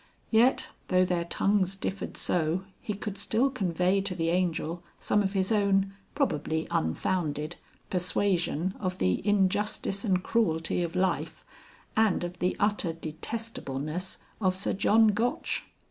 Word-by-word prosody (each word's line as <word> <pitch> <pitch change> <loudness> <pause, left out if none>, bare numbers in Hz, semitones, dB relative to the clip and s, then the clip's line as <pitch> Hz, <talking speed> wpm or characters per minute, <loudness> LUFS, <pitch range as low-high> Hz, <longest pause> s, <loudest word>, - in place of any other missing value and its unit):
Yet, 235 +4 +4 0.2
though 185 0 +4
their 175 -2 0
tongues 195 +2 +1
differed 195 0 -4
so, 170 +2 +1 0.2
he 210 - -3
could 200 0 -5
still 220 +7 +2
convey 185 -4 +1
to 190 -1 -1
the 165 -1 0
Angel 170 -1 0 0.2
some 210 - +2
of 195 -1 -1
his 190 +1 +1
own 195 -2 +2 0.2
(probably 160 - 0
unfounded) 150 - -1 0.4
persuasion 180 -1 +1
of 185 -2 -2
the 90 -1 +1
injustice 200 0 +1
and 185 -5 +1
cruelty 175 -7 +1
of 170 0 -3
life, 185 0 -1 0.5
and 215 -5 +3
of 175 +1 -5
the 180 - 0
utter 205 -5 +1
detestableness 165 -1 -4 0.2
of 185 -2 +2
Sir 190 - -1
John 220 +3 +5
Gotch. 225 +4 -1
185 Hz, 135 wpm, -28 LUFS, 170-205 Hz, 0.5 s, John